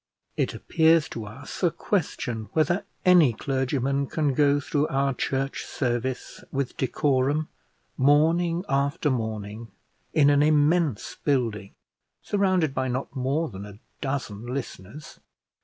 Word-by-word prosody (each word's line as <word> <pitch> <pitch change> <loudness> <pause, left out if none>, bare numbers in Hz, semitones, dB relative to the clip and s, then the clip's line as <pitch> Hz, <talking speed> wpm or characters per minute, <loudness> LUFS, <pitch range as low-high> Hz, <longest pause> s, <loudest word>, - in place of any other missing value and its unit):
It - - -1
appears 160 -1 +3
to 110 -2 -6
us 130 +7 -9
a 175 - +4
question 135 - -2
whether 175 +6 +1 0.2
any 175 -9 +6
clergyman 135 +2 -1
can 150 -2 0
go 145 +1 +3
through 145 +1 0
our 135 0 +1
church 135 +2 -2
service 125 0 -3
with 135 -2 -2
decorum, 140 +3 +1 0.5
morning 165 +6 +3
after 140 +2 +1
morning, 110 -2 -4 0.4
in 145 -2 +5
an 145 0 +4
immense 150 - +2
building, 115 -8 -1 0.4
surrounded 185 -7 +1
by 130 -1 -1
not 130 +2 -3
more 140 +5 0
than 100 -3 -8
a 100 -1 -10 0.2
dozen 120 -6 -4
listeners. 125 0 -7
140 Hz, 125 wpm, -26 LUFS, 125-155 Hz, 0.5 s, any